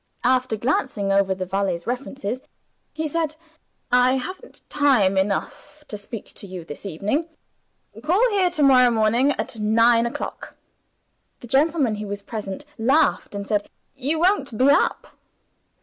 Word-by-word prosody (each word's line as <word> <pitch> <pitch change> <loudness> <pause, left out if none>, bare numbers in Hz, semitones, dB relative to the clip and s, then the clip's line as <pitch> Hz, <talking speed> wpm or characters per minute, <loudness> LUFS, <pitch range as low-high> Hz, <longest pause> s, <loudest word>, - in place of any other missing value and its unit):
After 255 -2 +2
glancing 215 -3 -1
over 195 -1 +2
the 185 0 -4
valet's 185 -2 -2
references, 250 -1 -4 0.5
he 315 0 -3
said, 310 0 -2 0.6
"I 250 +1 +4
haven't 370 - -7
time 260 -10 +3
enough 195 +9 -2
to - - -5
speak 210 +1 -9
to 200 - -10
you 180 -3 -8
this 155 +6 -8
evening. 210 - -2 0.8
Call 380 +11 +3
here 385 -3 +2
to 310 -4 -1
morrow 255 -3 +6
morning 235 +5 +2
at 225 - -5
nine 230 +2 +4
o'clock." 235 - -6 0.9
The 240 - -10
gentleman 280 -1 +2
who 210 0 -5
was 200 0 -6
present 215 +5 -6
laughed, 260 -2 +2
and 200 0 -4
said, 205 0 -1 0.3
"You 275 +4 -1
won't 315 - +1
be 265 +4 +5
up!" 285 - 0
245 Hz, 145 wpm, -23 LUFS, 205-285 Hz, 0.9 s, morrow